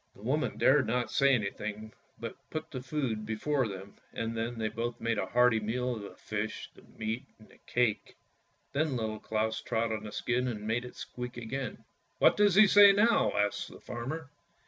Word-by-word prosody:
The 100 - -15
woman 145 +7 0
dared 135 -2 +4
not 120 +2 0
say 140 -1 +4
anything, 110 0 -4 0.3
but 115 -1 -5
put 155 0 -5
the 130 -4 -5
food 130 -5 -2
before 120 +5 0
them, 95 0 -9
and 115 0 -3
then 115 +1 -3
they 110 -1 -1
both 115 +2 -3
made 115 -2 0
a - - -1
hearty 125 -2 +4
meal 125 +3 -1
of 110 - -7
the 100 - -9
fish, 110 +1 -4
the - - -17 0.2
meat, 110 +4 -3
and 110 - -18
the - - -20
cake. 120 -4 0 0.6
Then 145 -1 +1
Little 110 -2 -3
Claus 110 0 -1
trod 115 -1 -1
on 110 -1 -3
the 105 - -6
skin 125 +3 0
and 105 -4 -4
made 115 +3 0
it 125 - -10
squeak 125 0 -7
again. 125 +3 -5 0.2
" - - -43
What - - +5
does 205 -3 +4
he 215 +2 +9
say 205 0 +8
now? 225 +4 +4
" - - -7
asked 105 0 0
the - - -12
farmer. 135 +5 -6
120 Hz, 205 wpm, -31 LUFS, 110-130 Hz, 0.6 s, he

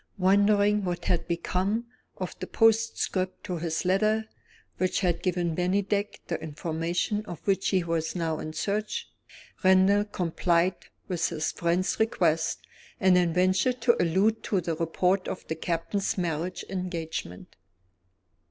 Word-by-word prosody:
Wondering 205 +2 +4
what 175 -2 -3
had 175 -2 0
become 185 +6 -1 0.3
of - - -4
the - - -5
postscript 225 -4 +1
to 180 - -3
his 165 +1 -2
letter, 215 +4 +2 0.5
which 185 +1 0
had 175 -3 +1
given 175 -2 0
Bennydeck 200 +3 0
the 170 - -3
information 165 +6 -2
of 175 - -6
which 195 -1 +1
he 185 -3 +2
was 165 -1 -2
now 165 -3 -1
in 155 - -5
search, 215 - -2 0.6
Randal 190 +2 +5
complied 175 -2 0 0.2
with 175 -3 0
his 160 -2 -2
friend's 175 +2 0
request, 165 -7 +1 0.3
and 185 -1 +5
then 175 -2 +3
ventured 185 +8 +2
to 235 0 +3
allude 195 +6 +2
to 195 - +1
the 165 -2 -2
report 180 +4 +1
of - - -5
the 160 - -2
Captain's 170 +5 -2
marriage 175 0 -2
engagement. 170 - -5
185 Hz, 135 wpm, -27 LUFS, 170-200 Hz, 0.6 s, Randal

